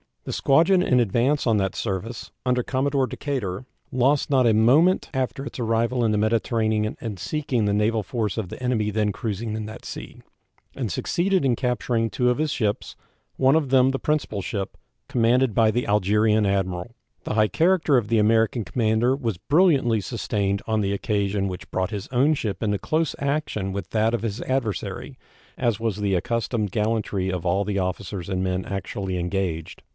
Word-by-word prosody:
The - - -5
squadron 170 +7 +4
in 125 -8 +3
advance 120 +6 +1
on 110 -2 +3
that 95 -1 -1
service, 110 +3 -4
under 125 0 +2
Commodore 135 +1 0
Decatur, 125 -9 -4 0.3
lost 135 +4 +2
not 130 -3 +3
a 115 - +4
moment 140 - +4
after 130 +1 -2
its 145 - -7
arrival 115 +1 +1
in 110 - +2
the 105 - +1
Mediterranean 110 0 +1
in 110 -4 -5
seeking 130 - -1
the 100 - +1
naval 110 +2 +1
force 110 +1 -2
of 105 -6 -3
the - - -9
enemy 120 -4 0
then 105 0 +1
cruising 110 +1 -4
in 110 -1 -4
that 110 +1 -9
sea, - - -8 0.5
and - - -3
succeeded 185 0 0
in 130 -3 +2
capturing 120 -2 0
two 125 +4 +1
of 125 - +1
his 155 -1 0
ships, 105 -6 -2 0.4
one 135 +2 +4
of 155 -4 +1
them 130 0 +5
the 135 0 -1
principal 150 -9 -1
ship, 100 -1 -4 0.3
commanded 120 0 +2
by 110 -1 +4
the 120 +2 -1
Algerine 105 +1 +3
admiral. 95 +2 -2 0.3
The - - -3
high 110 0 +3
character 165 - +3
of 115 -4 0
the 115 0 +2
American 110 +2 +2
commander 115 +3 +1
was 115 -9 -3
brilliantly 140 - +3
sustained 100 -3 -2
on 110 -1 +1
the 100 0 0
occasion 100 -1 -1
which 90 -1 -7
brought 95 0 -1
his 100 -3 -5
own 135 +5 +3
ship 105 -8 -3
into 105 -1 +1
close 155 - 0
action 140 -9 -1
with 95 -2 -5
that 110 +1 +1
of 120 - 0
his 110 0 -3
adversary, 130 -6 -3 0.4
as 120 -4 0
was 110 -3 -1
the 100 -2 0
accustomed 115 +1 -1
gallantry 105 -3 -1
of 90 -2 -3
all 95 +3 +2
the 100 -1 -1
officers 95 0 -4
and 95 -1 -1
men 95 0 -1
actually 95 -1 -4
engaged. 90 -2 -3
110 Hz, 180 wpm, -24 LUFS, 100-130 Hz, 0.5 s, them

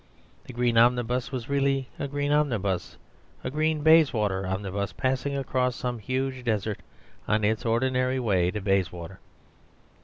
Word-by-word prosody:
The - - -9
green 120 -1 +2
omnibus 120 +1 +2
was 125 -3 -4
really 140 -1 +1
a 140 - -2
green 145 +1 -2
omnibus, 110 -12 0 0.5
a - - -3
green 155 +1 0
Bayswater 110 - +4
omnibus, 100 +1 -3
passing 135 +1 -1
across 130 -2 0
some 125 -2 -3
huge 130 +3 -3
desert 110 -3 -1 0.5
on 105 0 +1
its 110 +2 0
ordinary 130 +2 +1
way 95 -7 +2
to 105 +3 -4
Bayswater. 95 -2 -1
125 Hz, 140 wpm, -26 LUFS, 105-135 Hz, 0.5 s, Bayswater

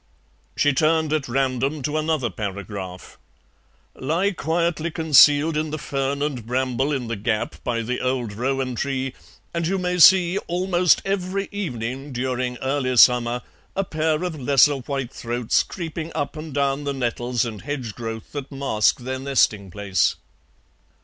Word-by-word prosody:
She 145 - +3
turned 155 +2 +2
at 155 -4 0
random 135 +3 -1
to 150 +2 -2
another 155 -7 0
paragraph. 95 -2 -6 0.7
"Lie 165 +9 0
quietly 170 -1 -1
concealed 155 -1 +5
in 155 +1 -1
the 155 - -3
fern 140 -1 -2
and 140 -6 -2
bramble 130 +3 0
in 135 -4 -1
the 115 - -2
gap 105 +1 -2
by 115 -2 -1
the 125 +3 -3
old 125 -4 -1
rowan 130 +3 -1
tree, 130 +1 -2 0.4
and 170 -1 -1
you 195 +2 0
may 180 -1 -1
see, 185 +2 +7
almost 180 -1 +2
every 195 0 -2
evening 135 - -4
during 125 0 -2
early 130 -2 0
summer, 120 0 +5 0.3
a 195 - +1
pair 155 -2 -1
of 170 -4 -3
lesser 140 +2 +4
whitethroats 125 -3 -1
creeping 165 -2 -6
up 145 - -2
and 155 -2 -7
down 140 0 0
the 140 -1 -2
nettles 120 -1 -1
and 110 -3 -6
hedge 130 -6 -4
growth 115 -1 -6
that 145 -1 -6
mask 135 -4 +1
their 130 +1 -4
nesting 120 -7 +1
place." 100 0 0
135 Hz, 150 wpm, -23 LUFS, 125-155 Hz, 0.7 s, see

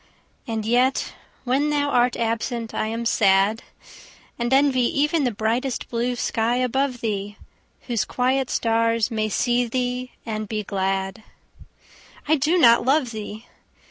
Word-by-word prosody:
And 220 -2 -3
yet 250 +4 +1 0.3
when 270 +4 +1
thou 290 -1 +1
art 245 -2 +2
absent 230 0 -2
I - - -1
am 230 +1 -3
sad; 200 0 +3 0.8
And 240 +1 -1
envy 270 -1 +4 0.2
even 295 0 +2
the 245 - +1
bright 220 +4 -1 0.3
blue 240 +1 -1
sky 230 0 0
above 255 0 0
thee, 205 -2 -3 0.4
Whose 235 -4 -1
quiet 255 +1 0
stars 230 0 +1
may 215 -1 -1
see 245 +3 +1
thee 250 +1 -3
and 215 -2 -4
be 215 -1 -2
glad. 195 +1 -2 1.1
I 310 - +4
do 310 +5 +1
not 235 -8 +6
love 265 -1 +2
thee! 215 +1 -7
235 Hz, 140 wpm, -23 LUFS, 220-255 Hz, 1.1 s, not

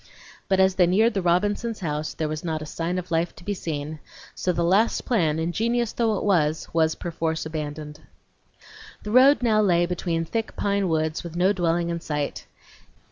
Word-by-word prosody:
But 190 -1 +2
as 190 0 +4
they 180 -1 +4
neared 220 +6 +3
the 195 - -1
Robinsons' 205 +6 0
house 150 -2 -3
there 155 - -2
was 155 0 -4
not 160 -2 -3
a - - -7
sign 165 +4 -3
of 180 -1 -5
life 165 +1 0
to 175 - -14
be 205 - -2
seen; 155 -4 -5 0.3
so 185 - -1
the 170 -1 -1
last 195 +7 +2
plan, 165 -11 +1
ingenious 225 +8 0
though 225 -3 +1
it - - -4
was, 160 -6 +1
was 160 -1 +2
perforce 165 -2 -3
abandoned. 150 -1 -6 1.0
The 210 - -5
road 260 +3 +6
now 215 -3 +3
lay 175 -4 +3
between 170 -2 -2
thick 225 +6 -3
pine 200 -2 0
woods 155 -1 -1
with 170 -1 -8
no 185 +3 +3
dwelling 170 -2 0
in 170 0 -2
sight. 150 -3 -4
175 Hz, 190 wpm, -24 LUFS, 160-200 Hz, 1.0 s, road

